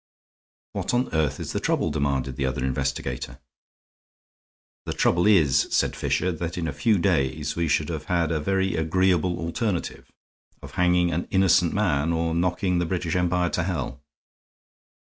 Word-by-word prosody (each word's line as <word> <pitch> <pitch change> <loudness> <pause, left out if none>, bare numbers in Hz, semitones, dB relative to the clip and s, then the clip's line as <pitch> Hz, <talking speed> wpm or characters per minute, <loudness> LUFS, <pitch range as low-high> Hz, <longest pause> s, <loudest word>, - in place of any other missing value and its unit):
"What - - -2
on 125 +1 0
earth 80 -4 0
is - - -5
the - - -1
trouble?" 80 - 0
demanded 70 -3 -1
the 65 0 -1
other 65 0 -2
investigator. 65 0 -3 1.5
"The - - -1
trouble 90 +3 +2
is," 75 -10 +4
said - - +1
Fisher, 90 - 0
"that 85 +1 -4
in 85 -2 -2
a 75 - -3
few 100 +9 +2
days 75 -2 0
we 85 -1 0
should 75 0 +1
have 80 -2 -4
had 85 -2 0
a 80 - 0
very 95 +3 0
agreeable 90 +2 +1
alternative 85 +3 -3 0.5
of - - -9
hanging 90 -1 +2
an 85 +2 -2
innocent 95 -3 +3
man 85 -6 +1
or 80 0 0
knocking 90 +1 0
the 85 - 0
British 85 -1 -2
Empire 90 0 +1
to - - 0
hell." 80 -6 -3
85 Hz, 160 wpm, -25 LUFS, 75-90 Hz, 1.5 s, is